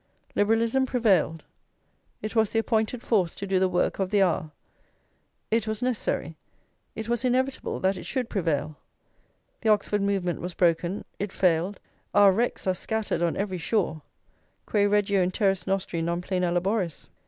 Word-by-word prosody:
Liberalism 230 +5 +2
prevailed; 190 - +2 0.8
it 215 +2 -4
was 220 -2 +3
the - - -2
appointed 225 +1 0
force 190 -7 +1
to 200 - -5
do 190 -1 +1
the 190 0 +2
work 180 +2 0
of 190 -1 0
the 205 -1 +4
hour; 165 -3 0 1.0
it 225 -1 +1
was 220 +2 -3
necessary, 210 - -1 0.6
it 220 0 -5
was 235 -1 0
inevitable 260 +1 0
that 190 0 +1
it - - -8
should 255 -3 -1
prevail. 160 -7 -1 0.9
The 225 - +1
Oxford 210 -1 +2
movement 195 -3 -1
was 180 0 -5
broken, 175 +2 +1
it 205 -1 -3
failed; 180 +2 +1 0.4
our 205 -1 +7
wrecks 235 +6 -1
are 185 - +2
scattered 220 +1 -2
on 170 -1 +1
every 190 -2 -2
shore: 170 -4 0 0.6
Quae 205 -1 +2
regio 200 -1 +2
in 180 - +2
terris 195 0 0
nostri 190 -3 -1
non 170 +1 -1
plena 180 -1 -1
laboris? 180 -1 -1
195 Hz, 160 wpm, -26 LUFS, 180-220 Hz, 1.0 s, our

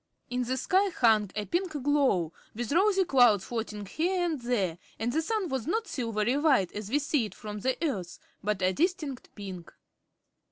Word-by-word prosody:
In 250 0 0
the 260 +2 -1
sky 385 +8 +2
hung 220 - +3
a 210 -1 -2
pink 345 - -1
glow, 260 - +2 0.2
with 240 +2 -3
rosy 385 +3 +4
clouds 240 - +5
floating 220 -3 -4
here 350 - 0
and 315 -6 -2
there, 200 -9 -1 0.2
and 240 +2 -1
the 320 - +2
sun 420 +3 -1
was 265 -4 -3
not 445 +6 0
silvery 230 - 0
white, 270 - +3
as 210 -1 -6
we 275 - +2
see 290 -4 +1
it 205 - -9
from 210 -1 -6
the 260 +5 0
Earth, 190 - -3 0.3
but 205 -2 -1
a 185 +1 +3
distinct 305 - -1
pink. 190 -5 -8
250 Hz, 185 wpm, -29 LUFS, 210-315 Hz, 0.3 s, clouds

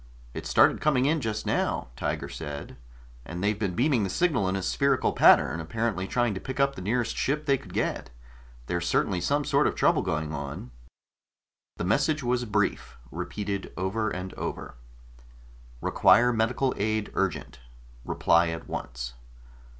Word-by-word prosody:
"It - - -6
started - - +4
coming 135 -4 +3
in 155 +2 +2
just 110 -3 -3
now," - - -1
Tiger - - -3
said. 75 -2 -7 0.5
"And 85 +7 -6
they've 105 0 +1
been 95 -4 -1
beaming 125 -3 +2
the 95 - -1
signal 140 - +1
in 95 - -1
a 95 - -2
spherical 140 +6 +1
pattern, 80 - +5
apparently 95 +3 -2
trying 120 -1 +1
to 95 - -4
pick 130 +7 -6
up 140 0 +3
the - - -8
nearest 115 +5 -1
ship 150 +3 -1
they 140 - +4
could - - -13
get. - - -2 0.6
There's 85 +4 -2
certainly 90 0 +1
some 145 +6 +1
sort - - +3
of - - -1
trouble - - +3
going 75 0 -2
on." 70 -3 -6 1.1
The - - -3
message 135 - +1
was 125 0 0
brief, 105 -2 -1
repeated 100 -2 -4
over 110 +4 -1
and 90 -1 -5
over: - - -5 1.1
REQUIRE 125 0 +4
MEDICAL 120 +4 +1
AID 110 +1 -1
URGENT 95 -9 -2 0.4
REPLY 85 +6 +2
AT 80 - -8
ONCE. - - -5
105 Hz, 160 wpm, -27 LUFS, 90-125 Hz, 1.1 s, pattern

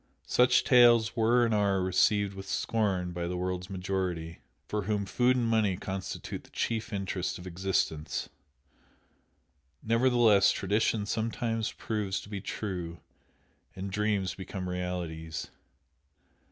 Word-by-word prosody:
Such 125 0 +4
tales 120 -3 +5
were 120 +1 +4
and 115 - 0
are 100 -2 +2
received 100 +2 +2
with 95 0 -9
scorn 95 -7 0
by 85 0 -3
the 90 +1 -3
world's 90 0 -3
majority, 90 -3 -3 0.3
for 105 -2 -2
whom 105 -1 0
food 125 +6 +2
and 125 -2 +1
money 110 -5 +2
constitute 95 0 -5
the - - -19
chief 115 -1 -2
interest 95 -2 -2
of 90 - -11
existence, 90 -4 -1 1.6
nevertheless 115 -3 +4
tradition 105 +2 0
sometimes 115 +1 -1
proves 100 -4 -2
to 100 - -13
be 100 -2 -5
true, 90 -6 -5 0.8
and 95 +1 -5
dreams 100 -3 0
become 95 0 -6
realities. 85 -3 -4
100 Hz, 125 wpm, -29 LUFS, 90-110 Hz, 1.6 s, tales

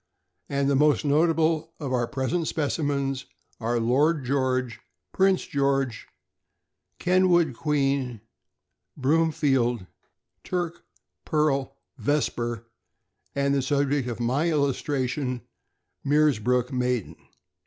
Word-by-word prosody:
and 140 0 0
the 140 - +2
most 150 +2 +3
noticeable 160 +1 +2
of 140 -4 -3
our 120 -2 +1
present 150 +5 -1
specimens 140 -3 -1 0.3
are 120 +1 0
Lord 140 +5 +2
George, 130 -2 0 0.3
Prince 190 -1 +3
George, 135 -4 0 0.9
Kenwood 180 -4 +3
Queen, 135 -3 0 0.8
Broomfield 135 - +1 0.6
Turk, 175 -2 -3 0.4
Pearl, 150 -4 0 0.2
Vesper, 120 -6 -1 0.7
and 140 0 +1
the 140 - +2
subject 140 -1 0
of 120 -2 -4
my 130 +8 +1
illustration, 135 -3 -1 0.6
Meersbrook 125 -4 +2
Maiden. 125 -4 -1
140 Hz, 90 wpm, -26 LUFS, 125-150 Hz, 0.9 s, most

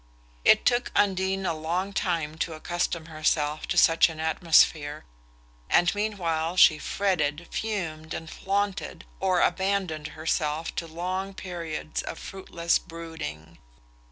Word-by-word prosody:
It - - +5
took 240 0 +2
Undine 190 -1 +1
a 170 - +1
long 175 +5 -2
time 165 -5 -1
to 165 - -2
accustom 170 0 -2
herself 155 -1 0
to - - -1
such 165 +1 +6
an 160 -1 -8
atmosphere, 160 -2 +3 0.6
and 175 +1 +4
meanwhile 180 -5 -1
she 155 -3 +7
fretted, 170 -5 -1
fumed 160 -8 -3
and 160 - -6
flaunted, 200 +3 -2
or 185 -2 +2
abandoned 185 -4 0
herself 155 0 -1
to 165 - -2
long 185 +4 -4
periods 170 -5 -4
of - - -6
fruitless 170 -3 -1
brooding. 160 - -8
170 Hz, 125 wpm, -27 LUFS, 155-190 Hz, 0.6 s, she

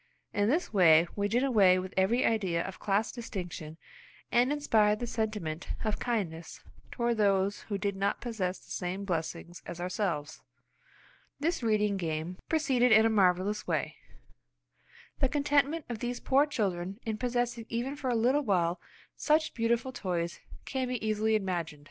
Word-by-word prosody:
In 205 +1 +2
this 315 -1 0
way 170 -4 +6
we 205 0 0
did 240 +5 +1
away 200 -9 +5
with 185 0 -5
every 200 +6 +2
idea 190 -7 +1
of 190 - -7
class 205 +2 0
distinction, 175 -9 -6 0.5
and 245 +3 +3
inspired 220 -8 +3
the 240 - -2
sentiment 210 -9 -3 0.2
of 215 -2 -1
kindness 175 -9 -3 0.3
toward 235 -2 -1
those 200 -1 +2
who 200 - -1
did 200 0 -2
not 200 +1 0
possess 195 -6 -3
the - - -17
same 185 +2 -3
blessings 170 -1 -4
as 175 - -7
ourselves. 175 -4 -2 1.0
This 330 +2 0
reading 210 -3 +1
game 165 0 -3
proceeded 265 -6 +2
in 220 0 +7
a 225 - +3
marvellous 195 0 +2
way. 155 -5 -1 1.2
The 270 - +2
contentment 290 +2 +1
of 235 -3 -5
these 245 +1 -3
poor 275 +3 +3
children 195 -6 -2
in 220 -1 -3
possessing 245 -2 -1
even 245 +4 -2
for 275 -3 -3
a 245 - +1
little 250 +6 +3
while 180 -7 +1 0.3
such 310 +1 +2
beautiful 235 +2 0
toys 175 -7 -3 0.3
can 260 -2 -2
be 245 -3 -3
easily 215 +1 +2
imagined. 175 -7 -2
210 Hz, 155 wpm, -30 LUFS, 180-240 Hz, 1.2 s, in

